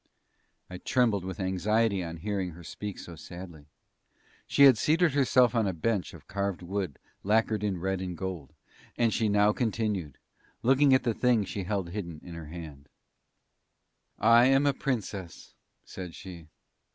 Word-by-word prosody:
I 90 -1 -8
trembled 115 -7 +1
with 95 +3 -6
anxiety 100 +2 +1
on 85 -1 -6
hearing 95 0 -3
her 85 +2 -12
speak 105 +4 -6
so 85 - -9
sadly; 85 -2 -10 0.8
she 140 - +4
had 135 -3 +9
seated 160 +8 +2
herself 130 -3 +4
on 115 -4 +2
a 95 - -1
bench 95 +2 -2
of - - -15
carved 100 -2 -3
wood 95 -4 -3 0.3
lacquered 110 0 +1
in 100 -4 -1
red 95 +1 -2
and 90 -2 -5
gold, 90 -7 -5 0.5
and 115 -2 +2
she 110 -2 +1
now 105 +1 +4
continued, 105 - -2 0.5
looking 135 +3 +4
at 130 - +1
the 120 -2 +1
thing 120 -3 +2
she 95 0 -5
held 95 -3 -2
hidden 85 -6 -5
in 90 - -9
her 85 -2 -8
hand: 75 -4 -10 1.3
"I 115 +2 +6
am 135 +2 +4
a 140 - +3
Princess," 105 -10 -4 0.3
said 90 -3 -8
she. 85 -4 -10
100 Hz, 160 wpm, -28 LUFS, 90-115 Hz, 1.3 s, had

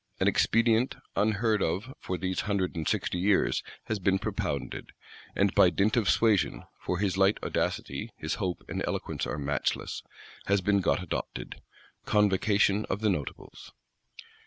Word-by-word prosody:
An - - +2
expedient, 115 +2 +3 0.2
unheard 105 +1 +2
of 100 +11 -1
for 90 - -3
these 95 +1 -2
hundred 100 -4 -1
and 80 -2 -3
sixty 90 - 0
years, 95 +2 +2 0.2
has 110 -2 -2
been 95 +1 +2
propounded; - - -4 0.4
and, - - +2
by - - +6
dint 105 +2 +1
of 115 -5 +2
suasion 110 -4 +2 0.2
(for 90 - -2
his 95 -1 0
light 95 +2 +4
audacity, - - -2
his - - -3
hope 90 -2 -2
and - - -3
eloquence - - -3
are 75 - -3
matchless) 70 -1 -2 0.5
has 100 0 +3
been 100 +1 +2
got 90 - +1
adopted,—_Convocation 105 +2 0
of 105 - -3
the 110 - +3
Notables. 75 -7 -6
100 Hz, 145 wpm, -29 LUFS, 95-110 Hz, 0.5 s, by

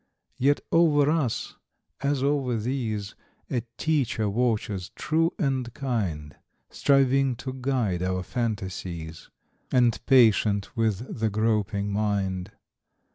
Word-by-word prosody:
Yet 140 +3 +3
over 150 -3 +4
us, 150 -8 -1 0.4
as 140 -1 0
over 135 -4 +1
these, 110 -4 -3 0.4
A 125 - 0 0.2
teacher 135 -9 0
watches, 105 -5 -1
true 165 +2 +1
and 130 -6 -1
kind, 95 - -3 0.4
Striving 135 -1 +3
to 130 +2 -6
guide 125 -9 -1
our 90 0 -1
fantasies, 95 -7 -4 0.4
And 120 -3 +3
patient 110 -6 +4
with 115 +1 -1
the 110 0 +1
groping 105 -1 0
mind. 100 -2 -1
115 Hz, 105 wpm, -26 LUFS, 100-135 Hz, 0.4 s, over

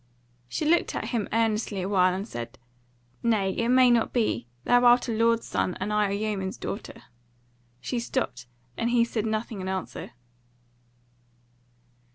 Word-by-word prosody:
She 305 - -2
looked 340 +3 +2
at - - -3
him 230 -5 -2
earnestly 215 -3 0
awhile 185 -1 +3
and 195 +3 -4
said: 120 - -7 0.6
"Nay, 215 -5 +2
it 230 +4 -1
may 255 0 +6
not 235 -1 +2
be; 170 - 0 0.2
thou 245 0 +4
art 245 +1 +5
a - - -1
lord's 230 +1 +2
son, 180 - -1
and 205 +3 -2
I 210 -1 +2
a - - -3
yeoman's 200 -2 -2
daughter." 205 - -6 0.8
She 240 - -3
stopped, 125 - -3 0.3
and 230 - -1
he 240 -1 +4
said 225 -2 -2
nothing 215 -2 -3
in 185 - -5
answer. 190 -7 -5
215 Hz, 155 wpm, -26 LUFS, 190-235 Hz, 0.8 s, may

